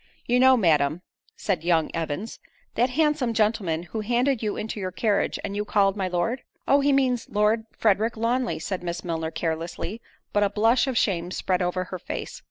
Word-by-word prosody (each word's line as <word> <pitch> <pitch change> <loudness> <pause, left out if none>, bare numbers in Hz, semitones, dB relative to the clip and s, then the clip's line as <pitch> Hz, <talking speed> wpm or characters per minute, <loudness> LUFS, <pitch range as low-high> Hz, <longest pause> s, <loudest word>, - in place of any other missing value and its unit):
"You 245 +1 +2
know, 260 0 +6
Madam," 160 -4 +2 0.3
said 185 -6 -1
young 165 -2 +2
Evans, 165 +6 -4 0.3
"that 245 +3 +2
handsome 290 -4 +1
gentleman 205 -7 +1
who 220 +5 -5
handed 245 +3 +1
you 215 -2 -2
into 215 0 -4
your 185 -2 -3
carriage, 205 +2 0
and 200 0 -4
you 205 - -1
called 200 -2 +2
my 195 -2 -1
Lord." 180 +8 -1 0.3
"Oh! 280 - +5
he 285 0 +3
means 255 -3 +1
Lord 215 +2 +2
Frederick 220 +1 +1
Lawnly:" 240 +2 0
said 190 -2 -4
Miss 175 0 -4
Milner 165 -2 -2
carelessly, 165 +6 -4 0.3
but 205 - +3
a 205 - +3
blush 225 +5 +3
of 260 -3 -1
shame 175 -5 +1
spread 185 0 -1
over 180 +1 0
her 185 0 -7
face. - - -6
210 Hz, 185 wpm, -25 LUFS, 180-235 Hz, 0.3 s, know